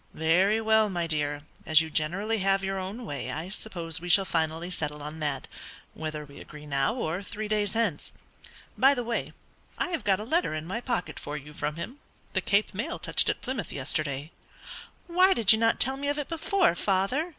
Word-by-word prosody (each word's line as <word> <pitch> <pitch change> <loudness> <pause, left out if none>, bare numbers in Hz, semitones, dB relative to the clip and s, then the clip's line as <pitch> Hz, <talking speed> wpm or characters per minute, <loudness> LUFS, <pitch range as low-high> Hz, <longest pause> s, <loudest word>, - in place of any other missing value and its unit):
"Very 185 +7 +3
well, 220 -1 +4
my 175 -3 -1
dear, 145 -2 -1 0.2
as 155 -1 +6
you 160 -1 -5
generally 195 +9 0
have 195 0 +2
your 195 0 -1
own 200 +6 -5
way, 145 - -4
I 160 +4 -4
suppose 170 -5 -4
we 175 - -6
shall 195 +2 +6
finally 165 +1 -1
settle 150 -3 -4
on 150 +2 -7
that, 145 -3 -2 0.5
whether 155 -1 -5
we 140 0 -13
agree 150 0 -11
now 140 - +1
or 175 -6 -2
three 215 +2 -5
days 210 -2 0
hence. 220 -10 -1 0.6
By 270 +2 +5
the 245 - -2
way, 235 0 -2 0.5
I - - 0
have 335 -3 -2
got 195 -1 +2
a - - -4
letter 315 - +1
in 155 0 -4
my 195 +7 -3
pocket 240 -7 -2
for 150 +1 -5
you 150 +1 -10
from 150 0 -3
him. 230 - -6 0.3
The - - +1
Cape 205 +1 +2
mail 240 - -3
touched - - +2
at - - -1
Plymouth 255 -7 -4
yesterday." 145 +2 -2 0.7
"Why 370 +2 +5
did 220 -2 +6
you 220 - +1
not 225 0 +3
tell 265 +1 +2
me 285 +1 -3
of 290 +1 0
it 295 - -3
before, 335 - +2
father?" 200 - 0
190 Hz, 205 wpm, -28 LUFS, 155-225 Hz, 0.7 s, as